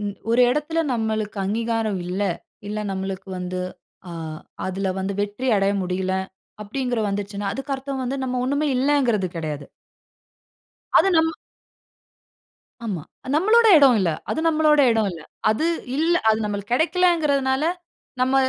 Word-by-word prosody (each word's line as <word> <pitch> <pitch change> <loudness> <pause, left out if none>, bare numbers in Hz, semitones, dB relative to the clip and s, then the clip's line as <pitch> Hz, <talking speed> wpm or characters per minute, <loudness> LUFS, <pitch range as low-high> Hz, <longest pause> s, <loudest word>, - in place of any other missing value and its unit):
ம் 200 -1 -3 0.2
ஒரு 235 +2 +4
இடத்தில 300 +4 -1
நம்மளுக்கு 220 -2 -2
அங்கீகாரம் 225 -1 -1
இல்ல. 185 +3 -2 0.5
இல்ல 210 +1 -3
நம்மளுக்கு 195 0 -4
வந்து 180 0 -4 0.5
ஆ - - -7 0.5
அதில 190 0 -1
வந்து 195 +1 -2
வெற்றி 205 +6 -2
அடைய 195 0 +2
முடியலை 185 +1 -1 0.4
அப்படிங்கற 245 +2 -2
வந்துருச்சுனா, 200 0 -3
அதுக்கு 270 +1 -3
அர்த்தம் 270 0 -4
வந்து 265 +2 -2
நம்ம 250 -1 -1
ஒன்னுமே 285 +3 0
இல்லங்கறது 250 -8 +2
கிடையாது. 150 -3 -4 1.3
அது 390 - +5
நம் 320 0 +3 1.5
ஆமா. 190 -7 -3 0.3
நம்மளோட 445 +7 +5
இடம் 275 -4 +6
இல்ல. 175 -4 +2 0.2
அது - - -1
நம்மளோட 305 -2 +4
இடம் 220 -2 +2
இல்ல. 165 - -9 0.3
அது 220 +9 +1 0.3
இல்ல, 330 +2 +2 0.2
அது 220 - +3
நம்மளுக்கு 205 +1 -4
கெடைக்கலைங்கிறதனால 305 -4 +2 0.6
நம்ம 260 +1 +2
225 Hz, 130 wpm, -23 LUFS, 195-280 Hz, 1.5 s, இடம்